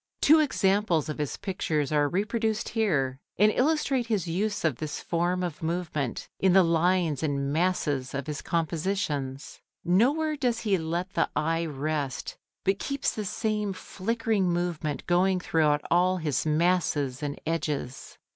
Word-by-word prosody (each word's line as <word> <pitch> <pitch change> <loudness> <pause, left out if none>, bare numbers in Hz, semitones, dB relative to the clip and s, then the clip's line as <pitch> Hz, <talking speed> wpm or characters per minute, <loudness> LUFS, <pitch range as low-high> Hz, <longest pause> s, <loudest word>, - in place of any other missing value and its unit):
Two 315 +2 +6
examples 195 - +2
of 155 - -4
his 150 -2 -2
pictures 155 -7 -2
are 145 -1 +2
reproduced 215 +4 -1
here, 145 - 0 0.2
and 210 +3 +5
illustrate 270 -2 +1
his 210 -7 0
use 205 +4 -1
of 145 -7 +1
this 155 -2 -4
form 175 +2 0
of 175 -4 -4
movement 160 -6 -2
in 190 -2 +4
the 190 0 +7
lines 170 -2 +2
and 140 -2 -1
masses 150 -6 0
of 140 -1 -3
his 150 -1 -4
compositions. 155 -5 -2 0.2
Nowhere 280 - +3
does 245 -5 0
he 210 -4 +2
let 170 +4 -3
the - - +1
eye 165 +2 0
rest, 145 -1 -3 0.3
but 195 +1 +1
keeps 275 -1 -1
the 215 - -4
same 210 0 -1
flickering 210 +1 -1
movement 170 -5 -2
going 185 +1 +3
throughout 155 -4 +2
all 180 +2 +3
his 155 -3 -1
masses 155 -5 +1
and 145 -1 -4
edges. 150 -5 -3
175 Hz, 145 wpm, -27 LUFS, 150-200 Hz, 0.3 s, the